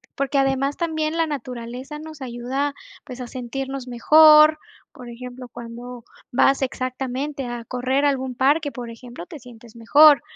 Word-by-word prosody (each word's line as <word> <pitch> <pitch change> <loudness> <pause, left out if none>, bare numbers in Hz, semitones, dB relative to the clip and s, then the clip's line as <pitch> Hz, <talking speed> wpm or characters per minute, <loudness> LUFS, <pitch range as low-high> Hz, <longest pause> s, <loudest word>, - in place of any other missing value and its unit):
porque 275 +1 -1
además 270 +1 +1
también, 315 -2 -2
la 330 -1 +1
naturaleza 255 0 -6
nos 310 -2 -10
ayuda, 260 +3 -3 0.3
pues, 255 -2 -8
a 245 - -6
sentirnos 265 +1 -5
mejor, 305 +5 +6 0.3
por 245 -2 -11
ejemplo, 250 +1 -9
cuando 240 +1 -9 0.3
vas 270 +3 +3
exactamente, 265 +2 -3
a 240 -1 -5
correr 255 +4 -1
a 290 - +4
algún 260 -2 -3
parque, 290 +4 +2
por 245 -3 -7
ejemplo, 230 -4 -10
te 300 - -10
sientes 235 -2 -15
mejor. 290 +5 +6
260 Hz, 150 wpm, -22 LUFS, 245-290 Hz, 0.3 s, mejor